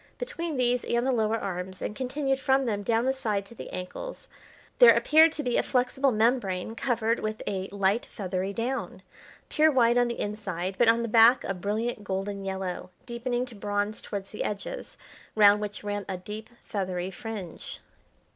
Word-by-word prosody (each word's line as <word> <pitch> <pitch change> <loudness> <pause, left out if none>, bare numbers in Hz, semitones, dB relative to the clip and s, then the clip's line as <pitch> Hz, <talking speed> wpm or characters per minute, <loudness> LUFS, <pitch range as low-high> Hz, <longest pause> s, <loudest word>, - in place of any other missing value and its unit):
Between 340 - -4
these 250 -1 +2
and 235 +1 0
the 265 - +2
lower 225 -2 +1
arms, 185 -2 -5
and 210 - -4
continued 270 +2 -1
from 265 0 +2
them 210 -4 -1
down 225 +3 +1
the 265 - +2
side 210 -7 -1
to 215 - -13
the - - -9
ankles, 185 - -7 0.5
there - - +9
appeared 315 +1 +6
to 300 - -3
be 245 -2 +1
a - - +4
flexible 260 +1 +1
membrane 220 -4 +1
covered 230 -2 0
with 215 0 -4
a 190 -1 -2
light 200 +3 0
feathery 190 -1 -3
down, 240 +6 -3 0.4
pure 310 +1 +4
white 245 -3 +4
on 245 - +3
the 235 - -4
inside, 195 -3 -3
but 240 - +5
on 230 +1 +4
the - - -1
back 230 +3 +6
a 195 - -2
brilliant 210 +4 -2
golden 195 +1 -3
yellow, 190 -2 -4 0.2
deepening 240 +1 -2
to 245 - -11
bronze 205 0 -2
towards 200 -1 -6
the 210 - -3
edges, 210 - -5 0.4
round 205 -1 +6
which 205 0 -5
ran 205 0 -2
a 190 - -2
deep 210 +4 -8
feathery 185 -3 -3
fringe. 195 -3 -7
220 Hz, 180 wpm, -27 LUFS, 200-245 Hz, 0.5 s, there